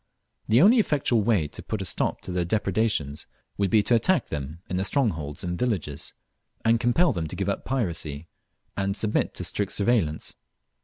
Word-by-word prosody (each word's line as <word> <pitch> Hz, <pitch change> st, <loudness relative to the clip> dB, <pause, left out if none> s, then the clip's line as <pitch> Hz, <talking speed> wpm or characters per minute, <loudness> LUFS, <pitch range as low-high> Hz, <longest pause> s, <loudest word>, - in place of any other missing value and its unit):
The 115 Hz, +7 st, +5 dB
only 230 Hz, +5 st, +7 dB
effectual 140 Hz, -, +2 dB
way 100 Hz, -8 st, +2 dB
to -, -, -8 dB
put -, -, -4 dB
a -, -, -3 dB
stop -, -, 0 dB
to -, -, -6 dB
their 90 Hz, -1 st, 0 dB
depredations 95 Hz, -6 st, 0 dB, 0.3 s
would 100 Hz, -1 st, +2 dB
be 105 Hz, +2 st, +4 dB
to 120 Hz, -, +1 dB
attack 155 Hz, +10 st, +3 dB
them 75 Hz, +1 st, -5 dB
in 90 Hz, -, -2 dB
their 95 Hz, -, 0 dB
strongholds 85 Hz, -, -1 dB
and 90 Hz, -1 st, -3 dB
villages, 90 Hz, -, -2 dB, 0.5 s
and 115 Hz, 0 st, +4 dB
compel 125 Hz, +7 st, +3 dB
them 85 Hz, -5 st, -2 dB
to 85 Hz, -, -6 dB
give 100 Hz, +1 st, -1 dB
up 100 Hz, -, -3 dB
piracy, 85 Hz, -, -2 dB, 0.5 s
and 100 Hz, 0 st, -1 dB
submit 105 Hz, -1 st, 0 dB
to -, -, -3 dB
strict 100 Hz, -1 st, -1 dB
surveillance. 100 Hz, -8 st, +1 dB
100 Hz, 185 wpm, -26 LUFS, 85-120 Hz, 0.5 s, only